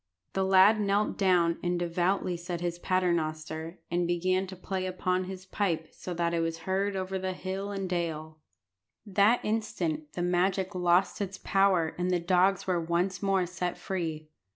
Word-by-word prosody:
The 190 - +1
lad 190 +3 +6
knelt 200 +1 +1
down, 175 -4 +3
and 175 0 0
devoutly 175 +2 0
said 175 0 -5
his 175 0 -3
Paternoster, 165 -2 -1
and 175 0 +1
began 185 +2 +1
to 190 - -8
play 185 +1 -3
upon 185 0 -1
his 185 0 -8
pipe 175 -5 -1
so 180 - -8
that 170 0 0
it 170 - +1
was 165 0 -2
heard 195 +1 0
over 190 0 -2
hill 190 +2 -4
and 195 -2 -3
dale. 160 -3 -3 0.7
That 205 +4 +3
instant 185 -9 -2
the 175 - -2
magic 185 +2 +1
lost 180 +2 +2
its 195 -1 -3
power, 190 -5 +3
and 180 +1 0
the 180 -1 +2
dogs 180 +2 +2
were 180 -2 +1
once 175 +2 -1
more 195 -2 +2
set 180 0 -3
free. 160 -5 -4
180 Hz, 165 wpm, -29 LUFS, 170-190 Hz, 0.7 s, lad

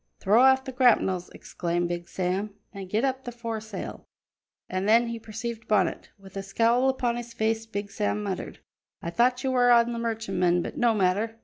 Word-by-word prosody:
"Throw 215 +5 +4
off 265 0 +5
the 265 - -6
grapnels," 215 -8 +2
exclaimed 175 0 -3
Big 175 0 -4
Sam, 190 +3 -2 0.2
"and 195 -2 -8
get 220 +6 +1
up 265 0 -2
the 245 - -6
foresel!" 225 -4 -6 0.6
And 185 +2 -2
then 230 +2 +5
he 230 0 -4
perceived 230 +1 -6
Bonnet. 195 -5 +1
With 195 -1 -15
a 195 - -3
scowl 230 +6 +2
upon 245 -2 0
his 240 -1 -7
face 225 0 0
Big 205 -1 -5
Sam 210 0 -1
muttered: 195 -3 -5 0.4
"I 170 - -3
thought 245 +6 +2
you 265 - 0
were 245 -1 +4
on 235 0 +5
the 235 - -4
merchantman, 195 -7 0
but - - -6
no 235 -2 +2
matter. 210 +4 0
220 Hz, 190 wpm, -26 LUFS, 195-240 Hz, 0.6 s, off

